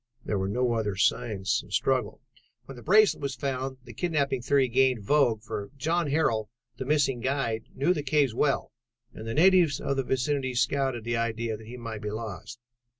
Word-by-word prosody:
There 100 - -1
were 95 0 -1
no 125 +3 +1
other 105 -4 -1
signs 100 +2 0
of - - -17
a - - -10
struggle. - - 0 0.4
"When 135 - -10
the 120 - -11
bracelet 210 - +4
was 140 -2 -3
found, 130 0 -3
the 120 -2 -11
kidnapping 140 -7 0
theory 135 +1 +2
gained 125 -2 +2
vogue, 120 -3 +2
for 100 -3 -5
John 165 +4 0
Harrel, 125 -8 +1 0.3
the 130 - -4
missing 135 -3 +1
guide, 120 -3 -1
knew 145 +7 +2
the 150 - -3
cave 145 -3 +1
well 140 +4 0 0.4
and 110 - -9
natives 165 +3 +4
of 140 - -2
the 135 - +1
vicinity 130 0 -1
scouted 135 -2 0
the 120 +1 -1
idea 115 -1 -2
that 110 0 -12
he 125 +2 -8
might 115 -3 -6
be 105 - -3
lost. 110 +1 -6
130 Hz, 190 wpm, -27 LUFS, 115-140 Hz, 0.4 s, bracelet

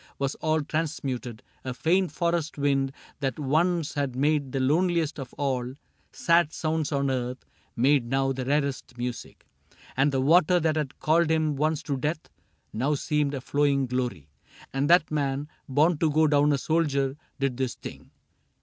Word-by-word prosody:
Was 140 0 -1
all 155 0 +1
transmuted; 135 -6 -3 0.2
a 130 -1 -4
faint 180 +4 +1
forest 170 -1 -1
wind 135 -1 +1 0.3
That 135 -4 -2
once 160 +3 +1
had 140 -3 -2
made 145 0 +1
the 135 - -1
loneliest 160 +3 +1
of 130 -2 -7
all 130 -2 -2 0.4
Sad 170 -2 +3
sounds 160 -1 -1
on 140 -1 +1
earth, 125 0 -3 0.3
made 130 0 +3
now 135 +1 +1
the 130 -1 -3
rarest 140 -2 -1
music; 120 0 -6 0.5
And 140 +2 +3
the 135 - 0
water 175 +5 +4
that 160 -1 +1
had 150 -4 -3
called 160 +1 +2
him 155 -2 +1
once 155 +2 0
to 140 -2 -2
death 155 +4 -3 0.4
Now 135 +7 0
seemed 145 0 0
a 135 - -4
flowing 140 0 +1
glory. 125 - -3 0.5
And 135 +2 0
that 175 -3 +5
man. 140 -1 -1 0.2
Born 150 +4 +3
to 160 - +2
go 155 +1 +3
down 145 0 +4
a 140 - +2
soldier, 140 -3 0 0.2
did 135 -3 -1
this 130 -2 -2
thing. - - -10
145 Hz, 165 wpm, -26 LUFS, 135-155 Hz, 0.5 s, that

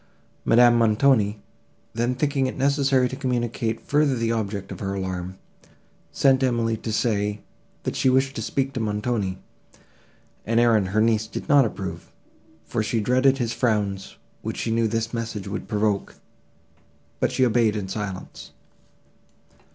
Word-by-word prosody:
Madame 120 0 +5
Montoni, 110 -2 +3 0.5
then 120 +3 0
thinking 140 -1 0
it 130 - -5
necessary 135 -1 +2
to 130 - -6
communicate 120 -3 -2
further 145 -2 +2
the 115 -1 0
object 100 -3 -3
of - - -7
her 100 -1 -3
alarm, 95 -1 -4 0.7
sent 135 -1 +3
Emily 115 -3 +1
to 110 - -5
say, 105 -2 0 0.4
that - - -3
she 130 - +2
wished 130 +1 +2
to - - -3
speak 135 +4 -1
to 130 - -3
Montoni; 105 -3 -1 1.1
an 115 +2 -1
errand 115 -4 +4
her 105 +3 +1
niece 110 -1 +2
did - - -7
not 140 -2 +6
approve, 95 -3 -6 0.5
for 115 - -2
she 110 +2 -1
dreaded 130 +4 +3
his 120 -3 -1
frowns, 105 -5 -1 0.3
which - - -5
she 115 - -2
knew 115 0 +2
this 115 +1 -2
message 115 -4 -4
would 100 - -5
provoke; 105 -2 -1 1.0
but - - +1
she 130 - +2
obeyed 115 -2 +2
in 100 -3 -3
silence. 95 -1 -6
115 Hz, 150 wpm, -24 LUFS, 105-125 Hz, 1.1 s, not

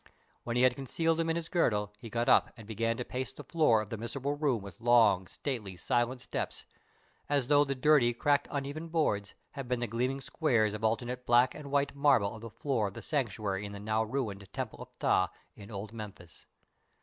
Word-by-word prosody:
When 120 - -3
he 125 - +3
had 130 -1 +5
concealed 165 +5 0
them 165 0 +1
in 165 - +1
his 170 -1 -3
girdle, 105 - +1
he 115 - -9
got 120 +2 -1
up - - +5
and 115 - -11
began 115 +2 -1
to 125 - -3
pace 130 +1 -4
the - - -10
floor 135 -10 +3
of 105 - -14
the 115 - -4
miserable 135 +5 -3
room 140 -8 0
with 100 +3 -11
long, 115 -6 +5
stately, 110 -8 -4
silent 120 +7 0
steps - - -4 0.6
as 140 -3 +1
though 145 0 +6
the 140 -1 -2
dirty, 130 -2 +4
cracked, 145 +4 +1
uneven 145 +3 -4
boards 150 -12 0 0.2
had 140 -3 -6
been 125 -1 0
the 120 - 0
gleaming 125 +4 -1
squares 120 -8 +1
of 105 +1 -6
alternate 120 +3 -1
black 120 +2 +5
and 145 -2 -9
white 140 0 +1
marble 140 -8 +3
of 110 - -10
the 115 - -7
floor 115 -1 -1
of 100 - -8
the - - -8
Sanctuary 105 -8 -1
in 100 0 -6
the 100 - -7
now 110 +2 0
ruined 105 -5 -4
Temple - - -5
of - - -9
Ptah 95 - +3 0.3
in 100 -1 -12
old 105 0 -6
Memphis. 100 -6 -10
120 Hz, 210 wpm, -31 LUFS, 105-140 Hz, 0.6 s, though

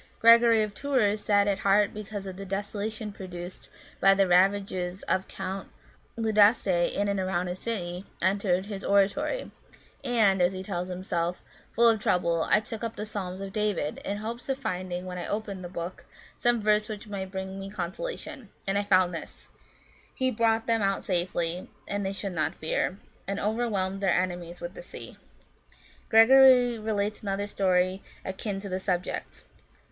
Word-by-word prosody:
Gregory 230 -1 +7
of 210 -1 -4
Tours, 215 -6 +1
sad 205 -1 +3
at 200 -1 +1
heart 200 +1 +3
because 210 -1 -6
of 190 -1 -6
the 195 - -7
desolation 205 +2 -4
produced 180 -2 -8 0.3
by 195 0 +6
the 195 -1 +3
ravages 185 0 +2
of 190 - 0
Count 195 0 -5 0.5
Leudaste 220 0 +4 0.3
in 205 - 0
and 200 -1 0
around 185 -1 -1
the 180 - -2
city, 185 -2 -3
entered 190 0 +1
his 200 -1 -6
oratory; 200 - +1 0.5
and," 220 -7 +3
as 180 +1 +3
he 185 0 -5
tells 180 -2 -3
us - - -3
himself, 175 -1 -2
" - - -28
full 235 0 +6
of 225 -2 +4
trouble, 170 -4 +1
I - - +5
took 225 +1 -7
up 230 -1 -3
the 210 - -4
Psalms 195 -3 -5
of 195 -1 -6
David, 210 -8 -1
in 200 - -3
hopes 230 +4 -6
of 270 - 0
finding, 185 -7 -4
when 180 -1 -5
I - - -4
opened 205 -3 -4
the 175 - -6
book, 175 0 -6 0.3
some 240 -1 +2
verse 210 0 +2
which 215 +1 -6
might 195 -2 -5
bring 190 0 -5
me 195 0 -6
consolation. 210 - -5 0.2
And 195 +1 +1
I - - 0
found 185 -3 +3
this: 165 - -8 0.3
* - - -30
He 260 0 +1
brought 225 0 +1
them 230 -1 +2
out 195 -1 0
safely, 175 -1 0 0.2
that 200 0 -2
they 195 0 -2
should 195 -1 -4
not 160 -3 0
fear; 170 +4 -1 0.3
and 200 0 -2
over 225 +3 0
whelmed 195 -1 -1
their 195 -3 +3
enemies 175 -1 -2
with 260 - -5
the - - -9
sea.' - - -10 0.5
" - - -27
Gregory 245 +1 +7
relates 210 -1 -2
another 200 -1 -2
story 185 -1 +1 0.2
akin 195 +1 -3
to 200 - -6
the 185 -1 -2
subject. 180 -1 -3
195 Hz, 180 wpm, -27 LUFS, 185-215 Hz, 0.5 s, Gregory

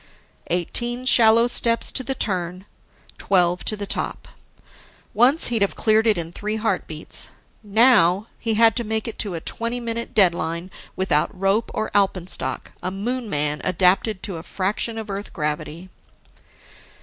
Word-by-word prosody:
Eighteen 240 +8 -1
shallow 230 -2 +6
steps 235 -1 +2
to 260 - -2
the 270 +1 -3
turn, 185 -3 -2 0.5
twelve 180 -2 +1
to 215 - +2
the 205 - -5
top. - - -4 0.9
Once, 250 +9 +6
he'd 230 -3 -1
have 200 - +1
cleared 220 +1 +2
it 215 -4 +3
in 165 -1 -4
three 210 +4 -4
heartbeats. 210 -8 -4 0.3
Now, 210 -3 +4
he 225 -1 -1
had 225 0 +4
to 240 - 0
make 220 +1 -3
it 230 - -7
to 200 -5 0
a - - -3
twenty 230 +6 -3
minute 235 -1 -5
deadline, 170 -2 +1 0.2
without 165 -6 +1
rope 195 +4 +1
or 215 - -2
alpenstock, 185 -9 -1
a 180 - -3
Moon 230 +5 -4
man 150 -2 -1
adapted 185 +3 +1
to 190 -5 -4
a - - -7
fraction 205 +6 -3
of 220 -1 -6
Earth 200 +1 -6
gravity. 150 +3 -4
205 Hz, 150 wpm, -22 LUFS, 180-230 Hz, 0.9 s, shallow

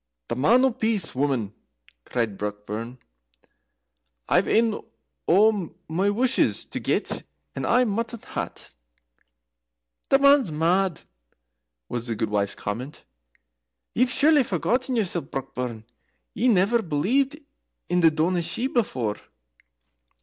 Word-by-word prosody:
"The - - -1
Man 230 - +4
o' 265 - +3
Peace, 220 -7 0
woman!" 130 -6 -1 0.5
cried 115 -5 -2
Brockburn. 105 +4 -5 1.3
"I've - - +3
ane 225 -1 +2 0.5
o' 200 -1 +3
my 185 +6 +1
wushes 245 +5 +2
to - - -3
get, - - -1 0.3
and - - -3
I 250 +2 +4
maun 230 0 -1 0.3
hae't." - - -5 1.4
"The 275 - +6
man's 280 - +5
mad!" 170 +2 +1 0.8
was 120 0 -4
the 115 - -2
gudewife's 105 -2 -1
comment. 125 +8 -6 0.9
"Ye've 250 +2 +2
surely 295 +2 +4
forgotten 245 - -1
yoursel, 185 -6 0
Brockburn. 125 -4 -5 0.5
Ye 245 - +1
never 225 +1 +3
believed 235 - 0 0.5
in 180 0 +1
the 165 - +7
Daoiné 165 +3 0
Shi 170 +9 -2
before." 130 - -1
180 Hz, 115 wpm, -25 LUFS, -, 1.4 s, the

